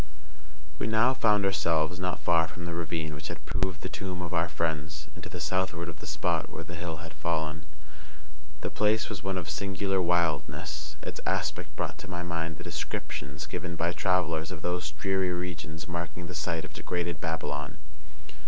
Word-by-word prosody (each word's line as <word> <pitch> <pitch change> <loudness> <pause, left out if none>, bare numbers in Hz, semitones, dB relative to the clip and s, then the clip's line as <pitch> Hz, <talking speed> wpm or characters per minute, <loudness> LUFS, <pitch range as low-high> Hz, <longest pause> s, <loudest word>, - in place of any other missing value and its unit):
We - - +1
now 110 +4 +6
found 105 -5 +5
ourselves 85 -1 +3
not 90 0 +1
far 85 -1 +5
from 85 +2 -7
the 85 - -2
ravine 85 -2 -1
which 75 +1 -5
had - - -6
proved 95 -2 0
the - - -2
tomb 90 -2 -3
of 90 - -3
our 85 0 +3
friends, 75 -1 -1
and 85 0 -10
to 90 - -5
the 90 - -5
southward 85 +1 +1
of 75 -3 -8
the - - -7
spot - - +1
where 85 - -5
the 85 +1 -8
hill 85 -1 -3
had 80 - -8
fallen. 80 0 0 0.9
The - - -1
place 105 +1 +3
was 105 -4 -3
one 95 -1 0
of 90 - -2
singular 95 +3 +1
wildness, 85 -2 +1
and - - -5
its - - -6
aspect - - 0
brought - - -1
to 90 - -8
my 90 -1 -2
mind 85 -2 -1
the 90 - -7
descriptions 75 -3 -3
given 85 +3 -3
by 85 +1 +2
travellers 85 -4 +2
of 90 -5 -6
those 90 -3 0
dreary 95 +4 +1
regions 85 -2 -3
marking 85 0 -3
the 90 - -5
site 85 -2 0
of - - -10
degraded 85 -3 -1
Babylon. 75 -2 -1
85 Hz, 190 wpm, -30 LUFS, 80-90 Hz, 0.9 s, now